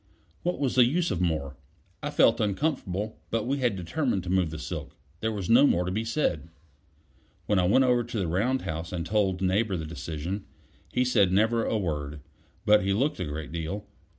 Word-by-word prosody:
What 175 +1 -1
was 135 -3 0
the 125 -2 +6
use 170 +7 +1
of 90 -2 -1
more? 75 -6 -1 0.4
I 145 - -2
felt 115 -5 +4
uncomfortable; 105 - -1
but 115 -1 -1
we 140 +3 0
had 120 -5 +1
determined 95 - -1
to 90 - -4
move 95 -3 +2
the 80 - -6
silk; 75 - -6 0.2
there 110 +2 -1
was 100 -4 -4
no 125 +5 +6
more 90 -7 +2
to 90 - -2
be 110 +4 -1
said. 115 - -1 1.0
When 105 -2 +2
I 90 - +3
went 130 +7 +5
over 125 -1 +3
to 120 0 -5
the 95 -4 0
round 115 +10 0
house 80 -2 -4
and 85 -2 -3
told 95 -2 +1
Neighbor 95 +1 +1
the 80 - -4
decision, 85 +4 -5 0.5
he 125 0 +1
said 105 -7 +3
never 110 +4 +2
a 110 - 0
word; 75 -6 -3 0.5
but 105 -1 +5
he 100 0 +1
looked 135 +7 0
a 90 - -1
great 75 0 -5
deal. 85 +5 -4
100 Hz, 205 wpm, -27 LUFS, 85-120 Hz, 1.0 s, the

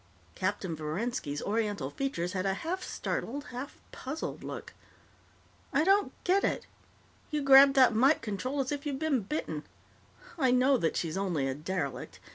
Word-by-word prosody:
Captain 185 - -2
Verenski's 155 - -3
Oriental 205 -10 -1
features 185 - -2
had 185 -1 -1
a 195 -1 0
half 355 - -3
startled, 280 +5 -3
half 250 +3 -6
puzzled 285 +5 -5
look. - - -7 1.0
"I 290 +2 +3
don't 395 +3 +3
get 385 +2 +3
it. - - 0 0.6
You 300 -2 -1
grabbed 275 0 +8
that 255 -3 +6
mike 265 +7 +4
control 255 +6 -2
as 260 - -3
if 290 -1 -3
you'd 280 -2 -2
been 295 -4 +1
bitten. 190 - -3 0.8
I 260 -3 +3
know 255 +2 +4
that 165 -8 0
she's 165 +1 -2
only 175 -8 0
a 135 - -1
derelict. 145 -4 -4
240 Hz, 155 wpm, -30 LUFS, 185-280 Hz, 1.0 s, grabbed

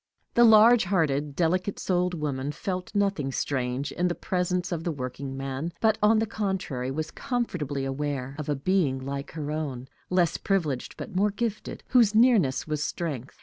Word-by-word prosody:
The 240 - +5
large 225 0 +7
hearted, 150 -6 0
delicate 180 +4 0
souled 180 -1 0
woman 145 -3 -2
felt 185 +5 -4
nothing 195 -9 +1
strange 130 0 -2
in 180 +1 0
the 175 - -1
presence 180 0 -1
of 165 -2 -2
the 170 - -1
workingman, 135 +2 -5
but, 220 -1 +2
on 215 +2 +5
the 220 - +2
contrary, 190 - -3
was 155 +3 -3
comfortably 155 - -2
aware 135 -1 -3
of 150 - -4
a 145 - +1
being 145 -2 +1
like 140 +1 -5
her 150 -2 -4
own, 140 -5 -4 0.2
less 175 -2 +2
privileged 160 -10 -1
but 195 - -7
more 200 +3 +3
gifted, 215 +1 -4
whose 230 -5 +4
nearness 220 - +4
was 150 -1 -2
strength. 145 -8 -4
165 Hz, 165 wpm, -27 LUFS, 140-195 Hz, 0.2 s, large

